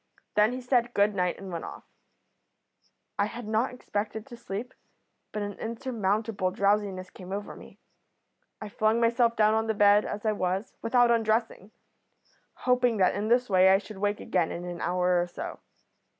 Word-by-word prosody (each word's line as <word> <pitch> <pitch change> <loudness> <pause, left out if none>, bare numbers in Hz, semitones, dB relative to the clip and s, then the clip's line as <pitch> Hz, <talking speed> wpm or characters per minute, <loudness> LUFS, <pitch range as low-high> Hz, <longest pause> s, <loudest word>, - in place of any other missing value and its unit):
Then 210 +2 +4
he 255 - -5
said 245 -1 +1
good 205 +1 +3
night 180 -2 0
and 195 -1 -8
went 165 -1 -4
off. - - -8 1.4
"I 200 - +4
had 235 0 -8
not 220 +4 +1
expected 220 -3 -4
to 245 - -10
sleep, 230 +2 -6 0.6
but 210 - -3
an 205 0 -6
insurmountable 220 -4 -1
drowsiness 195 -1 0
came 185 0 -11
over 205 +1 -5
me. - - -14 0.8
I 215 - -6
flung 215 +2 +1
myself 235 0 +2
down 215 0 +4
on 220 0 0
the 220 - 0
bed 205 0 +5
as 210 +1 -5
I 215 - +3
was, 190 0 -2
without 240 +1 +3
undressing, 225 -3 0 1.0
hoping 250 -2 +3
that 185 -2 +3
in 205 +2 -2
this 245 +2 +3
way 190 -1 +5
I 190 - +6
should 205 0 -9
wake 205 +1 0
again 175 -3 0
in 175 - -5
an 175 -1 -6
hour 180 0 +2
or 175 - -2
so. 175 - -7
210 Hz, 175 wpm, -28 LUFS, 195-230 Hz, 1.4 s, I